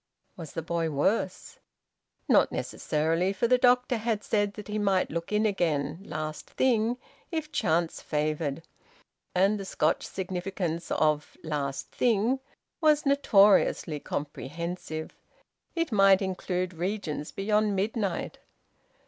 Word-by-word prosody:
Was 165 -5 -9
the 165 - -3
boy 165 0 -1
worse? 185 +6 -1 0.7
Not - - +4
necessarily, 165 +5 0
for 235 - +1
the 250 +1 +4
doctor 250 0 +4
had 220 -2 -1
said 205 -2 0
that 210 - -8
he 210 0 -2
might 195 -2 +1
look 170 +3 -4
in 210 +1 +2
again 160 -6 0
`last 155 -4 -5
thing,' 240 -2 +1 0.3
if 315 -2 -3
chance 165 - 0
favoured. 150 0 -2 0.7
And 195 +3 +3
the - - -4
Scotch 160 -4 0
significance 180 -2 -3
of 150 -1 0
`last 145 -3 -2
thing' 240 +2 +2 0.4
was 305 -2 +4
notoriously 205 - +4
comprehensive; 155 +3 -5 0.6
it 330 -4 -1
might 195 -2 +5
include 185 -1 -2
regions 170 -4 -3
beyond 210 +1 +1
midnight. 200 -1 -2
190 Hz, 120 wpm, -28 LUFS, 160-215 Hz, 0.7 s, might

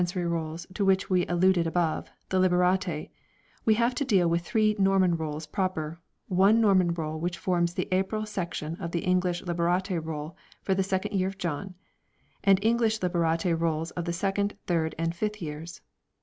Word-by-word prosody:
10Se 180 +1 -1
cerv 170 - -1
Rolls 165 0 -3
to 200 - -1
which 190 0 +2
we 180 -1 +2
alluded 175 -1 +3
above 165 -1 -1 0.2
the 185 - +1
Liberate 180 -2 +1 0.5
we 220 - +5
have 235 +2 +2
to 280 - -1
deal 195 -10 +3
with 170 0 +1
three 215 +4 +1
Norman 195 -2 +3
Rolls 155 -1 -4
proper, 165 -1 -2 0.3
one 195 +4 +4
Norman 190 -5 +4
Roll 160 -2 -3
which 175 +2 -2
forms 175 -1 0
the - - -1
April 195 +4 0
section 175 -6 -4
of 170 -3 -6
the 170 - -1
English 180 -1 +1
Liberate 175 0 0
Roll 155 0 -5 0.3
for 195 - +1
the 190 - +1
second 190 +1 -1
year 185 -1 +2
of 195 +1 -6
John, 180 +1 -4 0.7
and 195 -1 +6
English 225 -1 +2
Liberate 170 -1 +1
Rolls 165 0 -1
of 175 - -4
the 170 - -1
second, 200 +3 -1
third, 160 -3 0
and 165 +1 -1
fifth 210 +4 -3
years. 160 +1 -7
180 Hz, 180 wpm, -27 LUFS, 165-195 Hz, 0.7 s, and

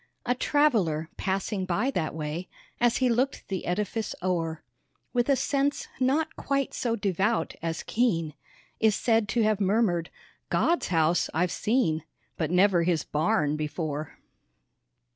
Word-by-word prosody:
A 245 - +2
traveller, 220 - +2
passing 195 +1 -1
by 200 +9 0
that 160 - -2
way, 155 +3 -4 0.3
As 240 -1 +3
he 260 - +2
looked 250 +3 0
the 190 -2 -3
edifice 210 +4 -2
o'er, 165 -3 -1 0.5
With 245 +1 +1
a 275 - +5
sense 280 +2 0
not 290 +5 +1
quite 275 -1 -1
so 235 -2 -1
devout 205 +1 0
as 165 -1 -3
keen, 165 -10 0 0.5
Is 220 -2 +4
said 225 -3 +2
to 230 +2 +2
have 215 -1 +1
murmered, 190 -4 +2 0.4
"God's 340 +1 +2
house 165 0 +2
I've 175 +2 +1
seen, 210 - +1 0.3
But 160 - -1
never 180 0 +4
His 165 -3 +1
barn 150 -1 +1
before!" 155 0 -4
195 Hz, 140 wpm, -27 LUFS, 165-240 Hz, 0.5 s, a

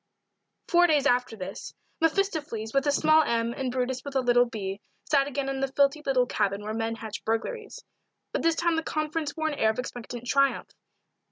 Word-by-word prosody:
FOUR 350 -1 +5
days 300 -4 +3
after 245 -2 +2
this, 190 -1 -7 0.2
mephistopheles 315 - 0
with 275 +1 +2
a - - +4
small 310 +2 +5
m 235 -4 0
and 260 -1 -3
brutus 255 0 -2
with 280 -1 -7
a - - +4
little 245 0 +4
b 200 -3 -5 0.3
sat 280 -2 +4
again 280 -1 -3
in 270 0 -2
the 270 - +1
filthy 280 +2 +2
little 260 -3 +2
cabin 200 -3 -1
where 215 +1 -4
men 225 0 -2
hatch 220 -2 -7
burglaries 415 - -3 0.5
but - - -1
this 330 0 +2
time 340 -1 +1
the - - +1
conference 310 -1 -3
wore 315 0 0
an - - -3
air 220 - +4
of 220 - -1
expectant 245 -1 -6
triumph. 275 +1 +1
270 Hz, 195 wpm, -27 LUFS, 230-310 Hz, 0.5 s, FOUR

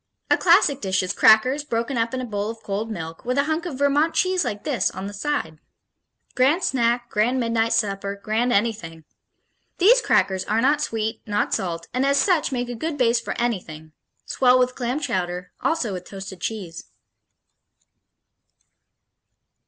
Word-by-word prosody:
A - - +7
classic 335 -6 +4
dish 190 -2 0
is 180 - -2
crackers, 255 +7 +4
broken 235 -1 -2
up 230 0 0
in 260 - -3
a - - -4
bowl 205 -2 -3
of 225 0 -8
cold 205 +3 -3
milk, 165 -6 -7
with 250 +2 -2
a 280 - +4
hunk 315 +3 -2
of 285 -7 -6
Vermont 285 +3 +2
cheese 370 -1 +2
like 205 0 -4
this 250 -10 0
on 190 +1 -7
the 200 - -6
side. 200 - -3 0.7
Grand 280 +8 +2
snack, 240 -1 +1
grand 235 +5 +1
midnight 230 -1 0
supper, 200 -1 -1
grand 220 +4 -1
anything. 200 -8 -1 0.7
These 470 +7 +5
crackers 190 - +1
are 215 +2 0
not 285 +5 +2
sweet, 225 -5 -2
not 205 0 0
salt, 170 -3 -3
and 255 +1 0
as 280 +1 +2
such 325 0 +2
make 245 -2 -2
a - - -3
good 300 +6 -4
base 240 -2 +3
for - - -5
anything 170 -10 -3 0.3
swell 250 -1 +3
with 255 0 +1
clam 250 +3 -2
chowder, 180 -9 -3
also 265 -11 0
with 180 -1 -6
toasted 195 -2 -9
cheese.... 185 -7 -5
230 Hz, 170 wpm, -23 LUFS, 200-275 Hz, 0.7 s, A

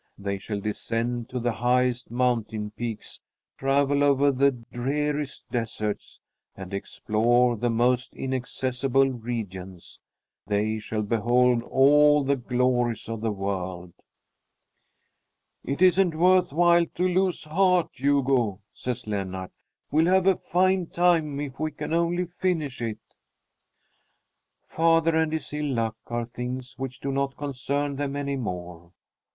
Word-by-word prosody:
They 100 -1 -3
shall 105 +1 -4
descend 115 +3 -2
to 125 - -3
the 120 0 0
highest 125 +1 +1
mountain 115 -3 -1
peaks, 115 0 -5 0.4
travel 140 +1 +2
over 140 0 +4
the 140 +1 +4
dreariest 140 +4 -3
deserts, 110 -3 -3 0.4
and 95 0 -9
explore 120 +5 +1
the 120 +2 -1
most 125 +2 +1
inaccessible 130 +1 0
regions. 100 -7 -6 0.5
They 105 +1 0
shall 110 0 -3
behold 120 +3 +2
all 145 +3 +5
the 140 +1 +2
glories 125 -2 0
of 115 -1 -5
the 110 -1 0
world. 95 -3 -4 1.7
"It 140 +7 -1
isn't 180 -2 +4
worth 180 +1 +4
while 170 +2 +4
to 180 +1 +1
lose 185 0 +1
heart, 180 +2 +2
Hugo," 130 -7 +1
says 125 -1 -4
Lennart. 95 -3 -4 0.4
"We'll 160 +3 +3
have 190 -1 +4
a 190 -1 +5
fine 185 0 +1
time 165 -5 +2
if 140 -2 -6
we 155 0 0
can 155 - -5
only 170 +2 +1
finish 170 -7 -2
it!" 115 -2 -2 1.7
Father 165 0 +2
and 160 -1 +2
his 160 -2 -4
ill 150 -3 -1
luck 115 -1 -1
are 120 0 -2
things 125 +2 -5
which 130 -1 -5
do 140 - -2
not 135 0 -1
concern 140 0 -2
them 140 -1 -2
any 140 -1 -2
more. 90 -7 -6
125 Hz, 130 wpm, -26 LUFS, 115-150 Hz, 1.7 s, all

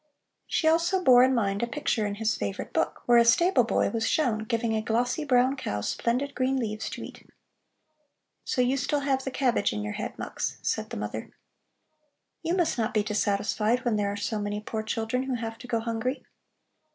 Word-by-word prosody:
She 315 - +1
also 340 +3 +3
bore 250 -4 +7
in 260 +1 +4
mind 200 -3 0
a 235 - 0
picture 235 -5 -1
in 200 - -3
his 220 +1 0
favorite 100 -1 -4
book, - - -1
where 240 -1 +6
a - - +6
stable 315 +3 +4
boy 230 - +1
was 225 -1 -1
shown 225 -8 +1
giving 230 0 0
a 220 - 0
glossy 245 +7 0
brown 260 -1 +3
cow 235 - -3
splendid 245 - -1
green 265 +1 0
leaves 220 -3 -3
to - - -6
eat. - - -12 1.1
"So 250 - +1
you 255 +2 +1
still 285 +2 0
have 270 -1 0
the 265 - -3
cabbage 255 - +1
in 105 0 -3
your 105 0 -4
head, - - -5
Mux?" - - -4
said - - -1
the - - -5
mother. 105 +2 -5 1.1
"You 335 +1 0
must 340 -8 +1
not 220 -1 -1
be 210 - +3
dissatisfied 210 +3 0
when 235 -3 +2
there 205 -1 0
are 205 - -4
so 210 +1 -2
many 205 0 -2
poor 220 +1 -4
children 225 +3 -2
who 265 -1 -2
have 225 -1 -5
to 250 - -10
go 230 -1 0
hungry. 230 +3 -3
235 Hz, 200 wpm, -27 LUFS, 215-260 Hz, 1.1 s, bore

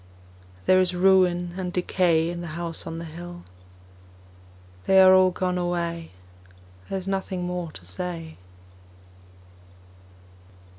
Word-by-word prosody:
There 185 - +5
is 185 -1 +1
ruin 180 -2 +3
and 180 -1 -3
decay 175 -2 +1
In 175 0 -6
the 170 -2 -7
House 170 -1 -5
on 165 - -5
the 165 - -6
Hill 175 +2 -9 1.4
They 190 0 +6
are 185 0 +8
all 185 0 +6
gone 180 0 -2
away, 170 -1 -2 0.8
There 195 - -2
is 190 0 -7
nothing 190 -2 -2
more 175 -2 -4
to 90 - -12
say. 165 - -6
175 Hz, 120 wpm, -25 LUFS, 170-185 Hz, 1.4 s, are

